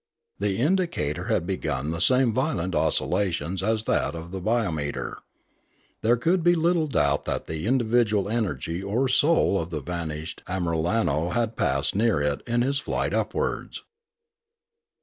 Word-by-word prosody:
The 100 -1 0
indicator 150 - 0
had - - 0
begun 75 -6 -2
the 85 0 -3
same 125 0 +4
violent 105 - -1
oscillations 85 +2 0
as 110 +2 0
that - - 0
of 85 +1 -8
the 95 0 -5
biometer. 90 -9 -1 0.8
There 120 +2 +3
could 170 +9 +2
be 175 +1 +5
little 165 -1 +2
doubt 70 - +1
that - - -2
the 80 +4 -4
individual 115 -5 +2
energy 100 -6 -2
or 110 +7 0
soul 145 - +3
of 85 - -6
the 80 -3 -3
vanished 80 0 -5
Amiralno 85 -1 0
had 115 -1 0
passed 70 +3 0
near 110 -4 +2
it 75 0 -1
in 120 0 +2
his 140 +2 +1
flight - - -2
upwards. - - -2
100 Hz, 145 wpm, -25 LUFS, 80-120 Hz, 0.8 s, be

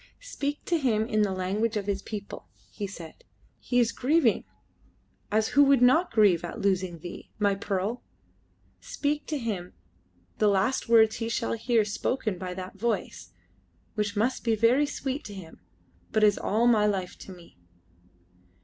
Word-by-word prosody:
"Speak 290 - -4
to 340 -2 +1
him 220 -6 +1
in 215 -2 0
the 205 -2 +1
language 200 +5 -1
of 200 - -3
his 200 -1 -2
people," 205 -2 -7 0.2
he 205 - -5
said. 170 -5 -11 0.4
"He 245 - 0
is 235 -2 +3
grieving 265 -3 +2 0.9
as 215 +1 +2
who 285 - +5
would 275 -3 +4
not 315 +9 +4
grieve 205 -7 +4
at 175 - -6
losing 185 -3 0
thee, 175 +2 -9
my 205 -1 +2
pearl! 200 +4 -2 0.8
Speak 295 0 -3
to 305 - -2
him 205 -8 -4 0.7
the 215 - +4
last 205 +5 +1
words 220 -2 +5
he 225 -1 -3
shall 115 - -1
hear 225 - +1
spoken 210 -1 -2
by 180 -1 -5
that 185 +1 -8
voice, 210 - -2 0.6
which 210 -1 -2
must 240 +5 0
be 230 -2 +2
very 240 +7 +3
sweet 275 0 -4
to 205 - -8
him, 175 -4 -11 0.5
but 215 -1 +2
is 205 -1 +5
all 220 +3 +1
my 220 -3 +4
life 190 -3 -2
to - - -10
me." 175 - -15
215 Hz, 165 wpm, -27 LUFS, 195-240 Hz, 0.9 s, who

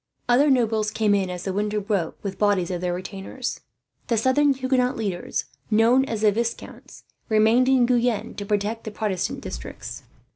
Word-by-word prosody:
Other 265 +5 +4
nobles 225 -5 +2
came 215 -1 +1
in, 195 -2 +1
as 180 0 -5
the 190 - -2
winter 210 +1 -1
broke, 195 -5 -2
with 195 -2 -5
bodies 200 -4 +2
of 175 -1 -3
their 180 -1 -1
retainers. 195 +7 -5 0.5
The 230 - +1
southern 260 +5 +3
Huguenot 260 -1 +1
leaders, 195 -6 -3 0.2
known 230 +4 +4
as 225 -5 -4
the 215 -1 +5
Viscounts, 230 +2 -5 0.3
remained 220 +4 +4
in 260 -2 +5
Guyenne 240 -2 +1
to 205 - -4
protect 210 +2 -1
the - - -3
Protestant 205 -4 -2
districts. - - -7
220 Hz, 170 wpm, -24 LUFS, 200-245 Hz, 0.5 s, the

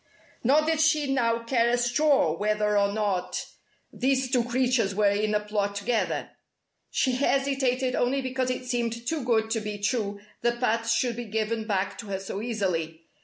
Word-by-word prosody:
Nor 285 +6 +4
did 320 -1 +1
she 305 -3 +2
now 230 -3 +1
care 235 -1 +2
a 245 - +2
straw 245 - +2
whether 210 +2 0
or 200 0 +3
not 205 -4 -1 0.5
these 260 0 0
two 250 -3 +3
creatures 245 -4 +1
were 205 -1 +3
in 210 +1 0
a - - +3
plot 205 -1 -2
together. 220 +3 -1 0.6
She 260 - +1
hesitated 265 -1 +1
only 255 +3 +1
because 260 -1 -2
it 255 0 -3
seemed 235 -1 -2
too 305 +2 -2
good 225 -2 +1
to 225 - +1
be 210 -1 -5
true 205 -1 -1 0.2
that 240 0 0
Pat 230 -2 0
should 235 +1 +1
be 240 - -4
given 220 +1 -2
back 195 0 -1
to 230 - -7
her 195 -1 -3
so 195 +1 -5
easily. 180 -8 -2
230 Hz, 175 wpm, -27 LUFS, 210-255 Hz, 0.6 s, Nor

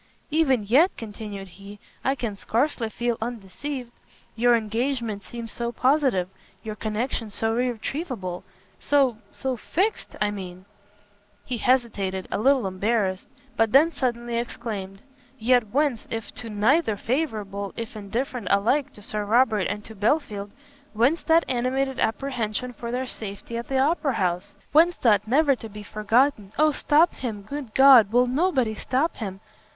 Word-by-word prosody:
"Even 275 -7 +3
yet," 270 - +5
continued 205 -3 -7
he, 200 +3 -12 0.3
"I 270 - +1
can 230 -6 -4
scarcely 230 +3 0
feel 235 +1 -2
undeceived; 240 +4 -5 0.4
your 240 +1 +4
engagement 230 -1 -1
seemed 230 +3 -7
so 235 0 -3
positive, 255 -7 +2 0.4
your 220 -1 -4
connection 220 +2 -3
so 225 +2 -1
irretrievable, 240 - -3 0.4
so, 270 -5 +2
so 265 -1 -3
fixed, 375 - -2
I 210 0 +1
mean. 185 -2 -8 0.4
" 205 0 -36
He 245 -2 -3
hesitated, 210 -7 0
a - - -1
little 265 0 +3
embarrassed; 190 0 0 0.3
but 225 -1 +2
then 305 +5 +6
suddenly 240 -4 -2
exclaimed, 210 -5 -6 0.3
"Yet 240 0 +3
whence, 270 0 0
if 225 -2 -5
to 235 -2 -7
neither 220 +3 +2
favourable, 210 -6 -2
if 230 -1 -5
indifferent 225 +2 -4
alike 235 +8 +2
to 210 - -13
Sir 210 0 -3
Robert 215 -2 +3
and 205 +1 -4
to 220 - -10
Belfield, 210 -2 0 0.4
whence 245 +10 +2
that 330 +1 +4
animated 260 +2 -1
apprehension 245 -1 -1
for 235 0 -7
their 250 +2 -2
safety 215 -1 -6
at 235 0 -4
the 270 - 0
Opera 285 +1 +2
house? 185 0 -1 0.2
whence 335 +3 +5
that 210 -3 +3
never 280 +3 +4
to 225 - -9
be 210 0 -9
forgotten 215 +1 +1
_oh 305 +1 +4
stop 310 +5 +4
him! 220 -5 -5
good 265 0 -7
God! 260 -6 +8
will 245 +2 +4
nobody 260 -3 +1
stop 265 +8 -1
him! 195 -5 -5
235 Hz, 150 wpm, -25 LUFS, 210-265 Hz, 0.4 s, God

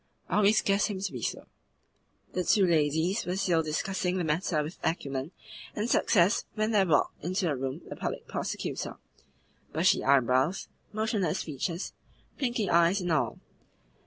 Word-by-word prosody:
"I - - +1
always 210 +1 +4
guessed 200 +1 +2
him 200 -3 -4
to 195 0 -3
be - - -6
so." - - -3 0.9
The 180 - 0
two 195 +2 +4
ladies 160 +4 +2
were 180 +1 -1
still 175 -4 +2
discussing 180 +4 -1
the 180 - 0
matter 155 0 0
with 155 +4 -8
acumen 140 -3 -2 0.5
and 210 +2 -1
success 200 -4 +3
when 215 0 0
there 200 -3 +3
walked 150 -3 +1
into 185 +3 -1
the 155 -4 +1
room 130 0 -4
the - - -7
Public - - -4
Prosecutor - - -4 0.8
bushy - - +3
eyebrows, 130 +5 +3 0.2
motionless 210 -5 -1
features, 165 +4 -4 0.5
blinking 240 -7 0
eyes, 170 +4 +4
and 175 -1 -1
all. 155 - +1
180 Hz, 155 wpm, -29 LUFS, 155-200 Hz, 0.9 s, always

